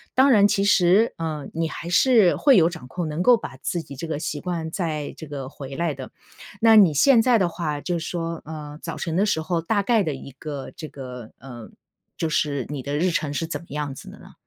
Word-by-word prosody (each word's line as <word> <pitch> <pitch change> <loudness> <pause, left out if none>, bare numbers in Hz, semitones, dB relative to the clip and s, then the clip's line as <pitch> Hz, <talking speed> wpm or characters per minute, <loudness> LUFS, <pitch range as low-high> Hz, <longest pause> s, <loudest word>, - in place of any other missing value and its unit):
当 265 +2 +5
然 205 -6 +6
其 200 -1 +1
实， 195 +3 +4
呃 155 -4 -4
你 165 0 -1
还 170 - -7
是 220 -2 +5
会 275 -4 +5
有 165 -2 +5
掌 160 -7 -9
控， 170 +5 -4
能 155 +4 -3
够 245 +1 +6
把 135 - -8
自 170 +4 -3
己 140 - -11
这 165 - -6
个 155 -2 -3
习 150 -1 -3
惯 170 -3 -3
再 155 -5 -3
这 - - -8
个 140 -2 -6
回 135 -2 -9
来 170 -1 -1
的。 130 -1 -9 0.5
那 225 0 +6
你 190 -8 +7
现 235 - +5
在 245 -1 +4
的 185 - +2
话， 155 -4 -3
就 175 -1 -2
说， 165 0 -4
呃 150 -1 -8
早 - - -6
晨 165 -1 -3
的 195 - +3
时 160 -6 0
候 165 +1 -1
大 205 +4 0
概 225 -2 +3
的 155 - -2
一 135 0 -9
个 140 0 -7
这 155 - -7
个， 125 -4 -9
呃 120 -3 -10 0.5
就 165 - -1
是 145 -3 0
你 145 -3 -4
的 145 +1 -2
日 180 +4 +2
程 150 -3 -1
是 165 - -2
怎 155 -3 -4
么 170 - -17
样 145 -1 -4
子 - - -11
的 - - -13
呢？ - - -15
160 Hz, 255 characters per minute, -23 LUFS, 145-185 Hz, 0.5 s, 你